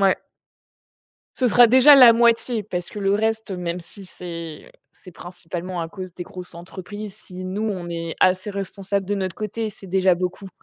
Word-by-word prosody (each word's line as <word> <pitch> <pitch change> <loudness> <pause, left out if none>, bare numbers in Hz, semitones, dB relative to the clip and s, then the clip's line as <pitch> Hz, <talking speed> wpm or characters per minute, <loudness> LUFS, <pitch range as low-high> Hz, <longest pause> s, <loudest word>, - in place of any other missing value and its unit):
Ouais. 195 -1 +4 1.2
Ce 255 - +1
sera 240 +1 +7
déjà 260 +5 +8
la 250 -4 +9
moitié, 235 0 +2
parce 180 -3 -5
que - - -8
le 195 0 +1
reste, 220 0 -1
même 180 -1 -4
si 195 +4 -12
c'est 170 -4 -8 0.2
c'est 185 - -15
principalement 175 +1 -6
à 165 - -4
cause 185 -1 -9
des 180 - -6
grosses 180 0 -10
entreprises, 190 +4 -8
si 185 0 -11
nous, 205 +4 -2
on 180 -3 -6
est 165 -1 -4
assez 185 +3 +2
responsables 195 0 -3
de 205 - -1
notre 185 -3 -3
côté, 215 +1 -4
c'est 195 -2 -12
déjà 185 0 +3
beaucoup. 180 +2 -4
190 Hz, 180 wpm, -22 LUFS, 180-210 Hz, 1.2 s, la